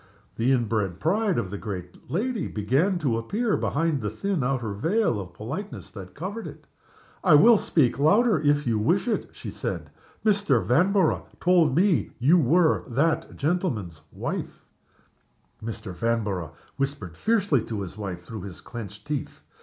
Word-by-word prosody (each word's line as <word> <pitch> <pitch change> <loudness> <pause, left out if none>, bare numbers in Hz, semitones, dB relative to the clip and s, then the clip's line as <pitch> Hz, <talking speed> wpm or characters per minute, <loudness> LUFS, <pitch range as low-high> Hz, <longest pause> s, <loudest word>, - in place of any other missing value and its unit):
The 120 +4 +1
inbred 110 -7 0
pride 200 - +1
of 95 - -2
the 100 - -5
great 90 -5 -7
lady 220 +4 -1
began 135 - +1
to 130 -9 0
appear 210 - 0
behind 155 -2 0
the 105 - -1
thin 170 - -2
outer 125 -5 -1
veil 165 - +1
of 90 -3 -8
politeness 185 - -6
that 95 -3 -10
covered 200 +8 -5
it. - - -11 0.6
"I 175 -6 +6
will 220 +7 +7
speak 135 -5 +2
louder 210 +10 +4
if 145 0 +2
you 115 -3 +1
wish 175 - +1
it," 225 - -1
she - - -8
said. - - -4 0.3
"Mr. 200 - +3
Vanborough 185 - +2
told 170 -6 +4
me 175 - +2
you 155 +9 +5
were 160 +4 +3
that 155 +6 0
gentleman's 130 - -1
wife." - - -5 1.0
Mr. 110 -4 -6
Vanborough 100 -6 -1 0.2
whispered 135 - -3
fiercely 200 - +2
to 110 -3 -4
his 95 -1 -6
wife 95 -5 -5
through 110 0 -7
his 95 -2 -8
clenched 105 -3 -9
teeth. 145 -2 -4
135 Hz, 155 wpm, -26 LUFS, -, 1.0 s, will